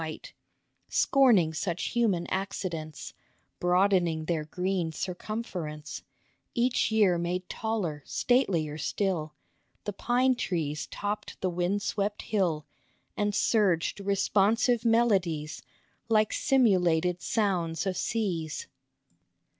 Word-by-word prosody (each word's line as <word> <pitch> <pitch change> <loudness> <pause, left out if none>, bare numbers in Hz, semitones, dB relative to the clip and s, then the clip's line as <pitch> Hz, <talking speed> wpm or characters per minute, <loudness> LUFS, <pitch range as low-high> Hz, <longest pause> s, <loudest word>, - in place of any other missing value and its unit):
QO - - -2
THE - - -3
OLD - - -17
PINE - - -10 0.6
Scorning 225 -13 +4
such 170 +1 -2
human 210 -8 +1
accidents, 185 -5 -4 0.5
Broadening 180 -3 +2
their 160 -2 -1
green 180 0 -1
circumference, 175 -4 -5 0.5
Each 245 +1 +2
year 200 -6 +4
made 180 +1 -2
taller, 205 -9 -2
statelier 170 - +1
still, 170 -7 -1 0.5
The 205 - -4
pine 250 +5 +2
trees 160 - -2
topped 205 +1 -4
the 185 - 0
wind 180 +4 -1
swept 205 -1 -2
hill, 170 -8 0 0.5
And 205 -1 0
surged 195 -6 +2
responsive 205 +4 +2
melodies 195 -10 +1 0.5
Like 215 -1 +3
simulated 180 -8 +2
sounds 180 -6 0
of 190 -1 -1
seas. 175 -10 -2
190 Hz, 105 wpm, -28 LUFS, 165-215 Hz, 0.6 s, Scorning